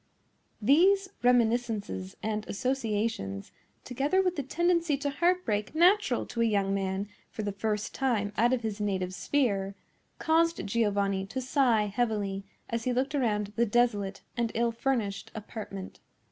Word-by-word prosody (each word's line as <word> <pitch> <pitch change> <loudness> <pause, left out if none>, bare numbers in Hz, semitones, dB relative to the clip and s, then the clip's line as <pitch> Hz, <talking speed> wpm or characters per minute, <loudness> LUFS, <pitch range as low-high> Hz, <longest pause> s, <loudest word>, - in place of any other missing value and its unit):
These 375 - +4
reminiscences 230 - +1
and 215 -1 -1
associations, 215 - -2 0.3
together 275 +9 0
with 365 -1 0
the 290 - -1
tendency 335 +1 +1
to 285 0 -2
heartbreak 310 - 0
natural 355 - +4
to 235 - -3
a - - +4
young 200 -3 +1
man 195 0 -1 0.2
for 215 - -5
the 205 - -1
first 210 +1 -2
time 220 -6 0
out 235 +3 +3
of 255 -2 +1
his 215 -2 -3
native 190 -3 -1
sphere, 200 -6 0 0.4
caused 330 +1 +2
Giovanni 200 -3 0
to 255 +6 -4
sigh 255 -4 +2
heavily 205 -2 -1 0.2
as 230 -1 -3
he 250 - +1
looked 260 +4 0
around 210 -7 0
the 235 +1 +2
desolate 205 -4 +1
and 235 -2 0
ill 235 +1 +2
furnished 225 -5 -2
apartment. 205 -3 -7
230 Hz, 145 wpm, -29 LUFS, 205-270 Hz, 0.4 s, These